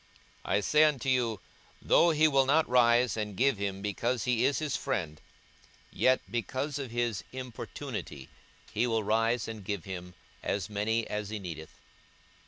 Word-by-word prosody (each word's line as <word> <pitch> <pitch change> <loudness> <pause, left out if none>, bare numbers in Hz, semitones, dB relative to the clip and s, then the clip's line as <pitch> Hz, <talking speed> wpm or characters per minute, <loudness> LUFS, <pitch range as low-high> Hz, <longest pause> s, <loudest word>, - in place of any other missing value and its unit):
42:011:008 - - 0
I - - +4
say 150 +8 +4
unto 140 -3 0
you, 120 -5 +1 0.4
Though 170 - +4
he 155 -1 +4
will 135 -3 +3
not 155 +3 +4
rise 120 -1 +4
and 105 -2 -3
give 135 -3 +2
him, 100 -1 -3
because 115 +3 -1
he 125 -2 +1
is 140 - +2
his 155 -3 -1
friend, 85 - -3 0.7
yet 130 0 +3
because 130 +7 -3
of 135 -3 -5
his 120 -3 -1
importunity 125 - -7 0.5
he 115 +3 +1
will 115 -2 0
rise 115 +2 +1
and 110 -2 -7
give 100 -3 -3
him 90 -1 -7 0.3
as 100 +1 -2
many 110 +2 0
as 105 -1 -3
he 110 - -3
needeth. 80 -5 -7
115 Hz, 165 wpm, -30 LUFS, 100-130 Hz, 0.7 s, I